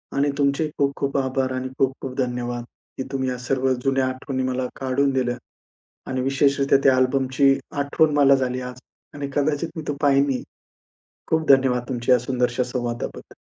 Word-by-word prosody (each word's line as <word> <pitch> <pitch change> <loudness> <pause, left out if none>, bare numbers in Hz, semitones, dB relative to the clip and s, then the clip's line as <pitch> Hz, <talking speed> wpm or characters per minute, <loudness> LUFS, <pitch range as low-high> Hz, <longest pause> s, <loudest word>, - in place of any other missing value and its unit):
आणि 140 +1 +2
तुमचे 140 +2 +1
खूप 140 -1 +2
खूप 140 0 -1
आभार 130 -1 0
आणि 130 0 -3
खूप 135 0 +2
खूप 130 - -5
धन्यवाद, 120 -2 -2 0.3
की 130 - -2
तुम्ही 130 -1 -1
या 125 - -3
सर्व 130 +1 0
जुन्या 135 -1 +2
आठवणी 130 +1 -3
मला 130 0 -1
काढून 135 +1 +1
दिल्यां. 125 -2 0 0.7
आणि 130 0 -1
विशेषरीत्या 140 +1 +3
त्या 135 -1 +5
अल्बमची 130 +1 +3 0.3
आठवण 150 +2 +2
मला 140 -1 +6
झाली 130 -1 -1
आज 125 - -14 0.4
आणि 140 -1 -4
कदाचित 145 +3 0
मी 160 - -4
तो 145 - 0
पाहीनही. 140 -2 +2 0.9
खूप 160 -1 0
धन्यवाद 130 -3 +4
तुमच्या 120 -1 0
या - - +4
सुंदरशा 125 0 0
संवादाबद्दल. 120 -1 -5
130 Hz, 165 wpm, -23 LUFS, 130-140 Hz, 0.9 s, मला